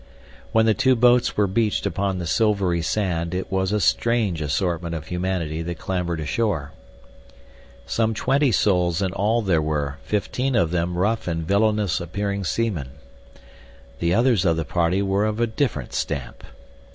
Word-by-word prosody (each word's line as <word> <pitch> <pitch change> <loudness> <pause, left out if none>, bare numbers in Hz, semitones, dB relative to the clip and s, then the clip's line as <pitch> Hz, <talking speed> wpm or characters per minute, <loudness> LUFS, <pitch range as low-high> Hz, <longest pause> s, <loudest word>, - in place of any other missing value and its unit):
When 110 0 +4
the 110 - +4
two 130 +2 +3
boats 125 +1 +3
were 105 - +4
beached 105 +2 0
upon 100 0 -1
the 90 - -4
silvery 100 -2 +1
sand 85 0 -1
it 95 - -4
was 95 0 0
a 105 - +1
strange 105 -5 +1
assortment 85 +3 -1
of 80 -1 -6
humanity 90 -3 -2
that 85 0 -4
clambered 90 -3 -2
ashore. 80 -1 -1 1.1
Some 110 -1 0
twenty 135 +3 +2
souls 90 -3 +2
in 95 -1 -1
all 110 +4 +1
there 90 -5 +2
were, 75 -2 -2
fifteen 125 +5 -1
of 85 -6 +2
them 85 0 -1
rough 110 +4 0
and 80 -2 -2
villainous 100 -4 +1
appearing 100 +3 -3
seamen. 85 - -2 1.1
The 85 0 +1
others 115 -4 +3
of 85 -3 +2
the 80 - -2
party 90 +5 +1
were 100 +1 +1
of 110 +1 -1
different 90 - -1
stamp. 70 -6 -4
95 Hz, 155 wpm, -23 LUFS, 85-110 Hz, 1.1 s, When